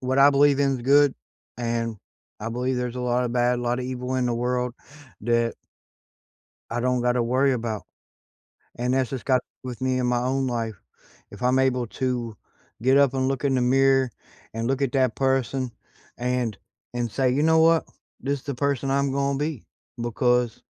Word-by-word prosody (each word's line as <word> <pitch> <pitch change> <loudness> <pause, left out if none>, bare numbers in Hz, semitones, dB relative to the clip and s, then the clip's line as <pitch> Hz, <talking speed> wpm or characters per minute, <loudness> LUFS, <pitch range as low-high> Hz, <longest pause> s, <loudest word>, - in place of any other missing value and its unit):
What 130 0 0
I 140 +1 +8
believe 140 0 +4
in 140 -1 +3
is - - -1
good 140 +2 +5 0.4
and 115 -1 -2 0.4
I 110 - -3
believe 125 +2 -1
there's 125 0 -3
a - - -3
lotta 125 0 +1
bad, 120 +1 +1
a - - -4
lotta 120 +1 -1
evil 125 0 -4
in 125 -1 +1
the 120 - 0
world 125 0 -1 0.5
that" 115 0 +1 1.2
"I 120 +1 -1
don't 125 0 +1
gotta 125 0 +2
worry 130 +3 +2
about," 115 -3 -3 0.9
and 125 +1 -1
that's 130 -3 +1
just 130 -3 -5
got 130 -2 +3 0.2
with 125 -2 -7
me 130 0 +1
in 125 - 0
my 125 0 +1
own 130 +2 0
life. 115 -3 -2 0.6
If - - -11
I'm 125 +1 +3
able 130 -2 +1
to 120 -2 -3 0.5
get 130 +2 +4
up 140 -2 +4
and 130 0 +1
look 135 +1 -2
in 135 -2 +2
the 125 - +2
mirror, 135 0 +3 0.4
and 115 +1 -2
look 135 +2 0
at 135 - 0
that 130 -3 +1
person 130 -1 0 0.4
and 125 -3 -1 0.4
and 120 -2 -2
say, 130 +1 +1
"You 140 - +1
know 160 +1 +4
what? 165 0 +4 0.3
This 140 +1 -1
is - - -27
the 140 - -2
person 135 0 -1
I'm 140 0 +1
going 140 0 0
be 150 -5 -3 0.3
because 120 0 +1
125 Hz, 190 wpm, -25 LUFS, 120-135 Hz, 1.2 s, I